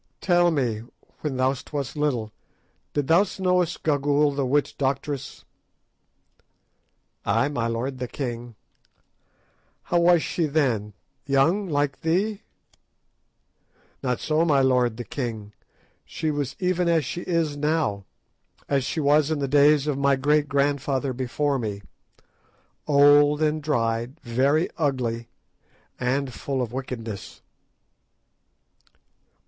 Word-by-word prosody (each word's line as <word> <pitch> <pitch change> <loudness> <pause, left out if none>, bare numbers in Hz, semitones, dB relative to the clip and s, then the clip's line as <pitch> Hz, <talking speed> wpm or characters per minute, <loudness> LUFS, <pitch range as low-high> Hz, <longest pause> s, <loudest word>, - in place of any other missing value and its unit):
"Tell 175 -2 +3
me, 125 -9 -1 0.4
when 145 -4 -3
thou 130 +1 +2 0.2
wast 140 -5 -3
little, 130 -8 -1 0.6
didst 145 -2 -1 0.3
thou 190 - -6
know 180 0 +3
Gagaoola 145 -4 +1
the 140 -2 0
witch 145 +3 +1
doctress?" 140 0 -3 1.8
"Ay, 115 +7 +1
my 120 -5 -1
lord 125 +3 -3
the 125 - -3
king!" 120 -3 -5 1.3
"How 175 - +1
was 170 -1 +4
she 165 -3 -1
then—young, 140 - 0
like 145 -2 -1
thee?" 195 +6 0 1.6
"Not 125 -3 -1
so, 155 +1 +1
my 150 -5 +3
lord 125 -3 +2
the 120 - -4
king! 110 -5 -5 0.5
She 155 - -3
was 145 -3 -3
even 180 -1 0
as 165 -4 +2
she 175 - -4
is 165 -5 -1
now 145 -10 -1 0.6
and 140 - +2
as 135 - -1
she 160 - -3
was 145 0 +3
in 155 - 0
the 140 -1 -1
days 145 +1 +4
of 145 -2 -1
my 140 0 +3
great 145 +2 +1
grandfather 140 -1 0
before 135 +3 -1
me; 105 -3 -4 1.0
old 145 0 +5
and 155 0 +1
dried, 120 -1 -1
very 135 +7 +1
ugly, 125 -6 -1 0.7
and 130 +1 -1
full 135 +1 -3
of 120 -1 -6
wickedness." 115 -6 -6
140 Hz, 120 wpm, -24 LUFS, 125-150 Hz, 1.8 s, old